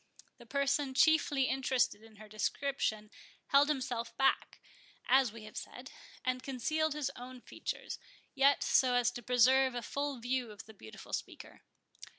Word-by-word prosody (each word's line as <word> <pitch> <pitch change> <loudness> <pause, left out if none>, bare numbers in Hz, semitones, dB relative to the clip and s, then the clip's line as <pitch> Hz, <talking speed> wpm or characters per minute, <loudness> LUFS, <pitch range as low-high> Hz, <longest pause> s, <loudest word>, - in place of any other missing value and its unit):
The 240 - -15
person 280 0 0
chiefly 295 -2 +4
interested 260 -5 +1
in 225 -1 -17
her 215 +1 -13
description 215 0 -2 0.4
held 280 +1 +5
himself 250 -5 -3
back, 270 0 +1 0.5
as 260 -2 +4
we 225 0 -11
have 215 - -12
said, 255 +3 -8 0.3
and 255 0 0
concealed 300 +4 -1
his 285 -2 -2
own 250 +1 -9
features, - - -6 0.3
yet 275 +1 +4
so 255 -2 +3
as 245 -2 +3
to 240 - -7
preserve 250 +2 +4
a 240 - -3
full 285 +3 -3
view 245 0 -2
of 210 -1 -11
the 220 - -13
beautiful 110 - -12
speaker. - - -6
255 Hz, 155 wpm, -33 LUFS, 230-275 Hz, 0.5 s, held